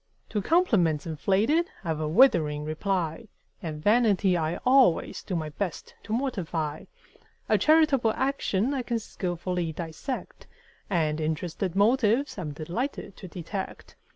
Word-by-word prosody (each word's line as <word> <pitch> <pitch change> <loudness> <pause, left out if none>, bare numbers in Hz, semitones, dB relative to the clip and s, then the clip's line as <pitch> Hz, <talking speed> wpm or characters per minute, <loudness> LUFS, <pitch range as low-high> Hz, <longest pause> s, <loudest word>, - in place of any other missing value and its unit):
To 210 - -1
compliments 195 - +2
inflated 205 - +1
I've 160 -2 -2
a 155 - -1
withering 155 - +4
reply; 170 +4 -2 0.3
And 155 -3 -6
vanity 205 -4 +3
I 160 0 -1
always 255 -9 +4
do 185 - -4
my 155 -2 -2
best 175 +3 -5
to - - -10
mortify; 175 - -2 0.6
A - - +3
charitable 300 -7 +4
action 265 -3 0
I 270 - -1
can 240 -1 -2
skilfully 180 -4 -3
dissect: 165 - -6 0.4
And 160 -4 0
interested 165 +3 -2
motives 230 +4 +2
I'm 155 -5 -4
delighted 175 - -4
to 185 - -9
detect. 180 +3 -6
185 Hz, 125 wpm, -27 LUFS, 160-240 Hz, 0.6 s, withering